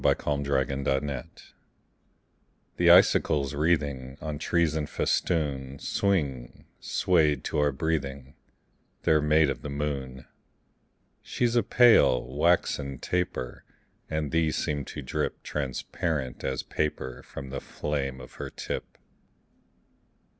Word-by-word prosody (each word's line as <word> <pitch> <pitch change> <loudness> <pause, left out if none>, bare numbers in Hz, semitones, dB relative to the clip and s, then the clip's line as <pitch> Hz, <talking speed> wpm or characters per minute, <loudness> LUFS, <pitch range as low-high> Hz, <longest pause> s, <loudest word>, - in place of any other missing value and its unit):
SILVER 70 -2 +1
FILIGREE 70 0 -1 1.6
The - - +4
icicles 70 -1 +5
wreathing 70 -4 0
On 75 -1 -5
trees 85 -1 +1
in 75 -2 -1
festoon 70 -5 -1
Swing, 70 -10 -1
swayed 75 -7 +2
to - - -1
our 75 0 +3
breathing: 70 -3 -3 0.7
They're 75 -1 +4
made 75 -1 +4
of - - -6
the 75 - -6
moon. 70 -3 -4 1.0
She's 120 -1 -1
a 120 - +5
pale, 120 - +5
waxen 70 -1 +1
taper; 90 -9 -3 0.5
And 75 -2 -2
these 80 -1 +1
seem 75 -2 -2
to - - -7
drip - - -3
Transparent 70 0 -3
as 65 -1 -2
paper 65 -4 -3
From 70 -1 -9
the - - -4
flame 70 -3 -3
of 65 - -11
her - - -5
tip. - - -6
75 Hz, 110 wpm, -27 LUFS, 65-80 Hz, 1.6 s, icicles